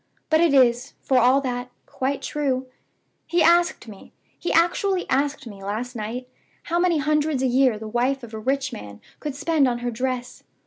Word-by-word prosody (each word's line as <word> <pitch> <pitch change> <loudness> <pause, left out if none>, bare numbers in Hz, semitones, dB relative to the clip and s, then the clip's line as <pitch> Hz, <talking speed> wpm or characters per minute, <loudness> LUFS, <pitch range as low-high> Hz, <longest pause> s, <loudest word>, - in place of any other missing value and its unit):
But 315 +1 +5
it 340 -3 +4
is, 250 0 +3
for 260 -2 +3
all 255 +3 +4
that, 250 -2 -3 0.2
quite 270 +2 -3
true. 270 -3 -1 0.6
He 340 -1 +2
asked 345 -6 +3
me 205 -3 -12 0.3
he 350 - -2
actually 360 +3 +2
asked 280 +1 0
me, 200 -4 -10
last 225 +5 -4
night 235 +3 -5 0.4
how 340 +1 -1
many 350 -2 +3
hundreds 300 -1 +1
a - - +3
year 255 -2 +3
the 220 +1 -7
wife 250 +4 0
of 230 -1 -10
a 220 - -5
rich 265 +2 -1
man 105 - -9 0.2
could 295 -3 -5
spend 295 -1 +2
on 240 -1 0
her 245 - 0
dress. 250 +1 -3
260 Hz, 185 wpm, -23 LUFS, 240-300 Hz, 0.6 s, But